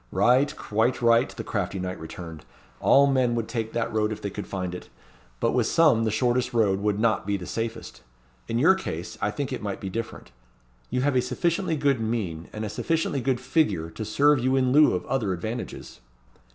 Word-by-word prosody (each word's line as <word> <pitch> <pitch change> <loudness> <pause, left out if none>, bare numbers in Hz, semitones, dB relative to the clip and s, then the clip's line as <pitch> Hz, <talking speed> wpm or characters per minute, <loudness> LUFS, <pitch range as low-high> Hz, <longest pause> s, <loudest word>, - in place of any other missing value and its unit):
"Right, 125 +9 +3
quite 110 +4 0
right," 115 +3 +4
the - - -7
crafty 100 -2 -3
knight 90 0 -4
returned. 80 -1 -9 0.4
"All 140 +1 +5
men 130 -3 +2
would 115 -2 -2
take 115 -2 -3
that 115 -1 -2
road 110 0 +1
if 110 - -4
they 100 - -4
could 105 - -6
find 90 -2 -4
it. 90 - -8 0.5
But - - +1
with - - +1
some 145 -9 +4
the - - +1
shortest 120 +2 0
road 100 -4 +3
would 105 0 0
not 110 -3 +1
be 100 0 0
the 90 - -8
safest. 115 +3 -5 0.5
In 115 - -1
your 160 +10 +6
case 90 - -5
I 100 - +1
think 135 +4 -4
it 130 - -4
might 100 -2 -4
be 95 - -5
different. 110 - -6 0.6
You 125 +1 -1
have 140 0 +1
a 125 - +4
sufficiently 170 +4 -1
good 140 -3 +2
mien, 100 -8 -3
and 110 0 -5
a - - -4
sufficiently 155 +4 -1
good 125 0 0
figure, 125 - 0
to 110 - -6
serve 140 +7 +3
you 130 +2 +1
in 130 -1 +2
lieu 150 -6 +5
of 90 - -4
other 110 -8 -1
advantages." 110 - -6
115 Hz, 205 wpm, -25 LUFS, 100-130 Hz, 0.6 s, your